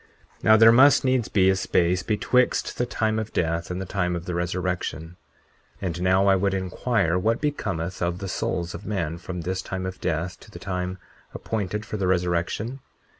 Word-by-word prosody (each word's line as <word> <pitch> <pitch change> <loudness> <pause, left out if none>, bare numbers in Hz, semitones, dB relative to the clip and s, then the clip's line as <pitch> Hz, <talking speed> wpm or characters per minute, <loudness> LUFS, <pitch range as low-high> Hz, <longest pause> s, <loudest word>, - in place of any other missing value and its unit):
40:6 - - -29
Now 110 0 +7
there 115 +1 +8
must 135 +4 +6
needs 130 -3 +2
be 95 -2 +3
a - - +1
space 90 -1 +1
betwixt 120 +4 +1
the 125 - +1
time 110 -2 0
of 110 0 -5
death 85 0 -1
and 90 0 -3
the 95 - -4
time 90 -2 -1
of 85 0 -5
the 90 - -3
resurrection. 90 -1 -3 0.6
40:7 - - -12
And 90 -2 -3
now 95 +2 +3
I 100 -1 +5
would 95 +1 +1
inquire 95 -1 0
what 115 +5 +1
becometh 95 - -3
of 85 0 0
the 95 +1 -5
souls 85 -2 -2
of - - -8
men 85 -5 -3
from 90 0 -6
this 95 +3 -2
time 95 0 -5
of 95 0 -6
death 85 +1 -2
to - - -16
the - - -11
time 90 -1 -4 0.4
appointed 105 -1 -3
for 105 - -4
the 95 -2 -1
resurrection? 90 +7 -1
95 Hz, 200 wpm, -25 LUFS, 90-105 Hz, 0.6 s, there